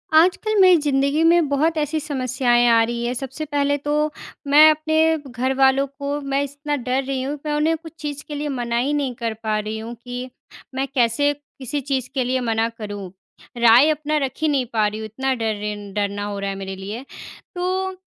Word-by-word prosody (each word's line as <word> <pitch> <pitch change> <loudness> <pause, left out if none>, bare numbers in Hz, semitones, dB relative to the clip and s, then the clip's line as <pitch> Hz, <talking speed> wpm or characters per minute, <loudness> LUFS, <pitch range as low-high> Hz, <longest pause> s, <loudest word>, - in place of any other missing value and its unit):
आजकल 370 +6 +4
मेरी 370 -2 +7
ज़िंदगी 280 +2 +1
में 335 -1 +4
बहुत 310 +3 +1
ऐसी 305 +1 0
समस्याएँ 255 -4 +1
आ 230 0 +5
रही 235 +1 -2
हैं। 240 - -1
सबसे 270 +4 -5
पहले 285 -1 0
तो 295 +1 0 0.4
,मैं 300 +2 +8
अपने 315 +1 +2
घरवालों 265 +2 +2
को 285 +1 -2
मैं 275 0 -1
इस 285 0 -8
ना 295 - +2
डर 260 0 -1
रही 265 0 -2
हूँ 280 +3 -3
कि 300 +2 -7
मैं 295 - 0
उन्हें 310 +2 +2
कुछ 325 0 -12
चीज़ 290 -1 -5
के 295 - -5
लिए 295 +1 -3
मना 240 -3 -2
ही 265 +5 +1
नहीं 275 -4 -1
कर 230 -2 -3
पा 215 -1 0
रही 215 +1 -4
हूँ 225 +2 -6
कि, 245 +1 -6 0.5
मैं 270 +1 -1
कैसे 275 +2 +2
किसी 285 -1 -6
चीज 265 -2 -2
के 265 - 0
लिए 255 +1 0
मना 225 -1 0
करूँ। 205 -4 -6 0.5
राय 235 +5 +6
अपना 305 0 0
रख 265 - -4
ही 315 - +2
नहीं 275 -4 +1
पा 215 -2 +3
रही 210 +1 -4
हूँ, 220 - -5
इतना 265 +5 -2
डर 225 -2 -1
रही 210 0 -4
न 205 -1 -10
डरना 205 0 -2
हो 205 -1 -4
रहा 200 0 -2
है 195 - -3
मेरे 195 0 -6
लिए। 205 +7 -7 0.5
तो 370 +1 -1
270 Hz, 215 wpm, -22 LUFS, 235-295 Hz, 0.5 s, मैं